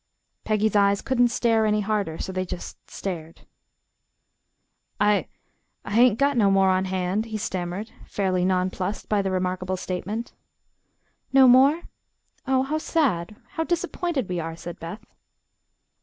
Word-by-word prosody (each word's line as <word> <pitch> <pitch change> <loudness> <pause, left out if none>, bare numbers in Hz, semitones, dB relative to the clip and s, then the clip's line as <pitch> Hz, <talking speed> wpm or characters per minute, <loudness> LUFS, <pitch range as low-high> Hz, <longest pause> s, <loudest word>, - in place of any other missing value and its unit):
Peggy's 215 0 +1
eyes 200 -1 +4
couldn't 245 -2 +2
stare 230 -1 +2
any 210 0 +2
harder, 205 -6 -1
so - - -4
they 185 0 -2
just 180 -1 -8
stared. 165 -4 -6 1.6
"I 210 0 +3 0.6
I - - -6
hain't 235 0 +5
got 280 +2 +2
no 205 -4 +4
more 195 -1 +4
on 185 0 +1
hand," 190 +3 -1
he 220 -1 -4
stammered, 190 +1 -4 0.2
fairly 185 -3 0
nonplussed 185 +2 -1
by 210 -1 +2
the 195 - -1
remarkable 185 0 -1
statement. 200 +6 -4 1.0
"No 270 -1 +7
more? 270 +7 +6 0.6
Oh, 260 0 +3
how 305 +3 -1
sad. 215 - 0
How 325 -4 -2
disappointed 340 - -2
we 180 -1 -2
are," 165 0 -4
said 170 0 -8
Beth. 205 +7 -8
205 Hz, 140 wpm, -25 LUFS, 185-235 Hz, 1.6 s, No